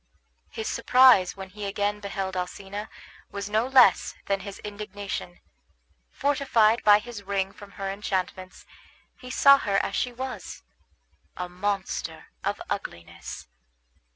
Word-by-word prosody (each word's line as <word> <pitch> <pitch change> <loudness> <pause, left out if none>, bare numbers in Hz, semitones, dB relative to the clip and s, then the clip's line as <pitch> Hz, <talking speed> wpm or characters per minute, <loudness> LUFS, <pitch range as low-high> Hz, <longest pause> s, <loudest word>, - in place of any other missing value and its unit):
His 220 - -5
surprise 240 -6 +5
when 190 -1 -8
he 210 +1 -6
again 205 +1 -1
beheld 195 -2 -4
Alcina 195 +3 -5 0.4
was 200 0 -6
no 220 +3 +2
less 255 -7 +5
than 195 0 0
his 200 0 -8
indignation. 205 -3 -6 0.7
Fortified 265 -6 +2
by 205 -1 +8
his 225 0 -8
ring 195 -1 -1
from 200 0 -14
her 195 - -5
enchantments, 190 -2 -4 0.5
he 255 - -11
saw 275 +2 +7
her 200 -5 0
as 200 - -3
she 250 - 0
was, 255 - -7 0.7
a 180 - -3
monster 190 +2 -3
of - - -1
ugliness. 85 0 -6
205 Hz, 125 wpm, -26 LUFS, 195-220 Hz, 0.7 s, by